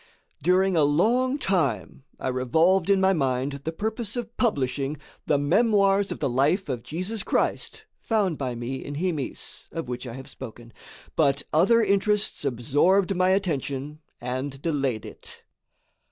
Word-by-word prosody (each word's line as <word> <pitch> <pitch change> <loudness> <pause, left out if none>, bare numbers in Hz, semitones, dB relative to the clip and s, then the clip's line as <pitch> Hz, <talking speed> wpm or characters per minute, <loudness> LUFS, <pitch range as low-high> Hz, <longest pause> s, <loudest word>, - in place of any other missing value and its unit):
During 185 +4 +3
a 160 - +4
long 235 - +2
time 140 - -1
I - - -2
revolved 160 +9 +2
in 200 -1 +5
my 190 0 +4
mind 135 -2 -1
the 160 - -1
purpose 220 +4 -3
of 235 -1 -5
publishing 140 - 0 0.3
the 150 - +3
memoirs 200 +5 +3
of - - -3
the 145 - -1
life 145 - +1
of 125 -3 -2
Jesus 185 - -3
Christ - - -1 0.2
found 205 -7 0
by 130 -4 -3
me 120 +3 -5
in 145 - -6
Himis, 160 -4 -3
of 165 -4 -5
which 125 +1 -5
I 115 - -6
have 130 +2 -9
spoken, 120 -2 -10 0.4
but 140 -3 +2
other 210 +9 +5
interests 205 -1 +1
absorbed 150 +10 +2
my 185 +1 +3
attention 150 -6 -1 0.2
and 130 +3 -4
delayed 140 -8 -1
it. - - -10
155 Hz, 150 wpm, -25 LUFS, 135-195 Hz, 0.4 s, in